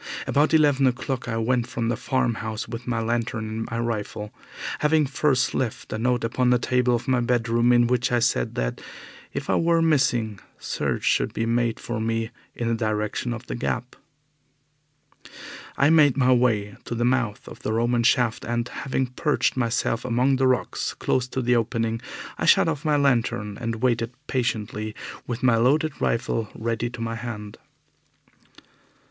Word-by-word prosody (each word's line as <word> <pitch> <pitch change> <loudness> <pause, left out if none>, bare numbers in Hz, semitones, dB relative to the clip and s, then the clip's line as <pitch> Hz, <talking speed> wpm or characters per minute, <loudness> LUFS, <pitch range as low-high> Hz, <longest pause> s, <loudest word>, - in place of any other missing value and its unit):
About 145 +2 +2
eleven 145 -4 +4
o'clock 125 0 -2
I 115 -2 -2
went 120 +1 +1
from 115 -2 -2
the 120 - +1
farm 130 -1 0
house 110 -1 -4
with 120 +1 -7
my 115 -2 0
lantern 115 -1 -1
and 110 +1 -3
my 115 - -3
rifle, 110 -2 -3 0.5
having 150 0 +3
first 135 -1 +1
left 125 -4 -3
a 110 - -3
note 125 +1 +1
upon 125 +2 +1
the 125 - +5
table 125 0 +2
of 120 +1 -4
my 130 -1 +3
bedroom 120 0 +2
in 120 0 +5
which 125 +1 +1
I 120 - +3
said 115 - +1
that, - - -2 0.5
if - - -5
I - - +2
were 165 0 +3
missing, 125 -10 +2 0.2
search - - -2
should - - +1
be 115 - 0
made 115 -1 0
for 120 -2 -4
me 115 0 -1 0.2
in 120 - -2
the 115 - +1
direction 110 +1 -1
of 120 0 -5
the - - -5
Gap. 125 +1 -3 1.8
I 140 +2 +4
made 145 -5 +5
my 130 -1 +4
way 110 -5 +1
to 120 - -4
the 120 +1 0
mouth 120 -4 0
of - - -10
the - - -3
Roman 120 +2 +1
shaft, 115 -1 +2
and, 120 0 -1
having 135 0 -2
perched 140 +4 0
myself 115 -2 0
among 125 +3 +2
the 130 0 +3
rocks 130 -1 -1
close 125 -1 0
to 130 0 -3
the 125 +1 +3
opening, 115 0 0 0.4
I - - 0
shut - - +6
off 150 -3 -2
my 150 -2 +2
lantern 115 -6 +1
and 115 0 -3
waited 115 -1 +1
patiently 110 -5 -2 0.3
with 120 +1 -4
my 120 -3 +4
loaded 145 +6 +1
rifle 115 -2 0
ready 115 +1 -2
to 120 -1 -8
my 115 0 -2
hand. 110 -3 -6
120 Hz, 175 wpm, -24 LUFS, 115-130 Hz, 1.8 s, shut